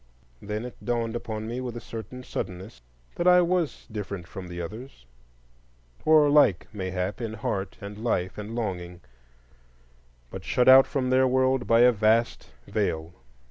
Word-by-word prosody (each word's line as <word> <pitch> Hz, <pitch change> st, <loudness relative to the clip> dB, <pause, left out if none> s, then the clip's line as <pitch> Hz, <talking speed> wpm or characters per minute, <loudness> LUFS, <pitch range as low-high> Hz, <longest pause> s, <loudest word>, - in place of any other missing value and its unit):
Then 105 Hz, +3 st, -4 dB
it 125 Hz, -, -11 dB
dawned 115 Hz, -1 st, -1 dB
upon 110 Hz, -2 st, -4 dB
me 120 Hz, +3 st, -4 dB
with 120 Hz, -2 st, -5 dB
a -, -, -4 dB
certain 115 Hz, +2 st, -8 dB
suddenness 95 Hz, -, -6 dB, 0.4 s
that 175 Hz, -, 0 dB
I 180 Hz, 0 st, +7 dB
was 175 Hz, -3 st, -1 dB
different 100 Hz, -4 st, -5 dB
from 95 Hz, -1 st, -8 dB
the 90 Hz, 0 st, -7 dB
others; 105 Hz, -, -8 dB, 1.0 s
or 155 Hz, -1 st, +6 dB
like, 145 Hz, -, +4 dB
mayhap, 95 Hz, +1 st, -3 dB
in 115 Hz, -2 st, -4 dB
heart 100 Hz, -2 st, -3 dB
and 100 Hz, +1 st, -8 dB
life 95 Hz, -6 st, -1 dB
and 105 Hz, +2 st, -6 dB
longing, 90 Hz, -6 st, -4 dB, 1.3 s
but -, -, -7 dB
shut 125 Hz, -, +1 dB
out 130 Hz, +1 st, +9 dB
from 130 Hz, -2 st, -1 dB
their 130 Hz, 0 st, +4 dB
world 130 Hz, 0 st, +1 dB
by 115 Hz, +1 st, +5 dB
a 125 Hz, 0 st, +7 dB
vast 110 Hz, +1 st, +1 dB, 0.2 s
veil. 80 Hz, +2 st, -2 dB
115 Hz, 155 wpm, -26 LUFS, 95-130 Hz, 1.3 s, out